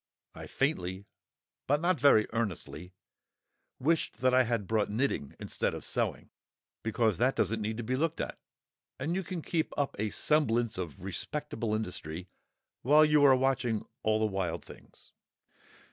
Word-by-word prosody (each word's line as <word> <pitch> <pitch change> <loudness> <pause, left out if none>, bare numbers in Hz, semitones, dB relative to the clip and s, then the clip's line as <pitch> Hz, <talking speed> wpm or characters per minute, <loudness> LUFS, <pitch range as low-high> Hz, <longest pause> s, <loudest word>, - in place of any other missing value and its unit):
I - - -9
faintly 100 - -1 0.6
(but 145 +2 +3
not 175 -1 +1
very 120 -5 +6
earnestly) 90 -5 -4 0.8
wished 150 -5 0
that 130 0 +3
I 130 0 +5
had 115 -3 -1
brought 110 -2 +1
knitting 105 - -1
instead - - -2
of - - -7
sewing, - - -2 0.5
because 110 -4 +1
that 130 +2 +3
doesn't 115 -1 0
need 110 +1 -2
to 120 - -3
be 125 +4 -1
looked 160 +4 -1
at, - - -4 0.6
and 155 +6 -1
you 190 - 0
can 170 -2 -5
keep 160 -2 -1
up 140 -1 0
a 105 0 0
semblance 120 -7 +1
of 85 -2 -6
respectable 115 - -3
industry 90 -4 -4 0.5
while 150 +4 +6
you 150 -1 +4
are 135 -2 +8
watching 130 -4 0 0.2
all 110 0 +2
the 110 - +2
wild 95 -5 -2
things. - - -15
115 Hz, 155 wpm, -30 LUFS, 105-145 Hz, 0.8 s, are